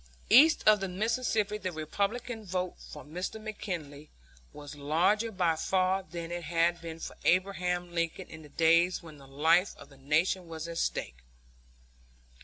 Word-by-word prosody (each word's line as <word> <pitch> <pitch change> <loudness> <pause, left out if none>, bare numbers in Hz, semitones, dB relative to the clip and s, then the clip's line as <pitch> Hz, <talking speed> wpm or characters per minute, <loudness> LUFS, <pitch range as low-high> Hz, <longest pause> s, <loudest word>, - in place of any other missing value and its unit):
East 295 +4 +7
of 215 -1 +7
the 195 - -2
Mississippi 210 +1 -1
the 185 -3 -3
Republican 205 +9 -3
vote 185 -2 -2
for 150 - -10
Mr. 180 +8 -5
McKinley 170 -9 -6 0.4
was 145 -1 -10
larger 175 +10 +1
by 175 -5 +1
far 185 +3 +1
than 170 -3 -7
it 175 -1 -4
had 170 +1 +1
been 165 -1 -7
for - - -7
Abraham 180 -1 +1
Lincoln 170 -1 -2
in 160 - -11
the 150 - -14
days 170 +4 +3
when 155 -3 -12
the 135 - -15
life 160 +7 +2
of - - -13
the 135 - -17
Nation 160 +6 0
was 160 0 -6
at 170 0 -4
stake. - - -2
175 Hz, 160 wpm, -30 LUFS, 160-195 Hz, 0.4 s, East